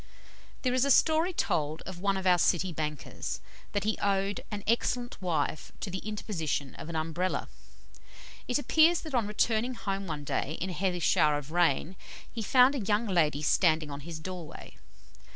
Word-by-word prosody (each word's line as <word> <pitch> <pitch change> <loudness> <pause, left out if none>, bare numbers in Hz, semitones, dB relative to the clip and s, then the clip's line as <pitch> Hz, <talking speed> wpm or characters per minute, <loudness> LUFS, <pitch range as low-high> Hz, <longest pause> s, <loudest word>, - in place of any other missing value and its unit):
There 250 -2 +1
is 255 0 +3
a 280 - +2
story 320 +6 +4
told 155 - -1
of 185 -2 -8
one 195 +1 +1
of 190 - -4
our 180 -1 +5
City 175 +1 +2
bankers, 150 -2 -4 0.3
that 205 - 0
he 215 +1 0
owed 195 0 0
an 205 -2 -5
excellent 240 +1 0
wife 155 -4 -1
to 195 - -4
the 190 - -3
interposition 170 - -3
of 155 - -9
an 165 - -5
Umbrella. 165 +4 -1 1.0
It 245 - +2
appears 320 +3 +4
that 315 -3 -8
on 235 -5 +1
returning 225 +3 +1
home 195 -3 -3
one 150 -3 -4
day 145 +2 -2
in 185 +2 -2
a - - -4
heavy 180 -1 -1
shower 150 -1 +4
of 145 +1 -7
rain, 175 +1 +2 0.4
he 230 - -4
found 250 +5 +5
a 280 - -2
young 210 +2 +1
lady 155 -7 +1
standing 155 -1 +3
in 140 - -5
his 160 +2 -7
doorway. 175 -1 -8
190 Hz, 180 wpm, -29 LUFS, 160-220 Hz, 1.0 s, our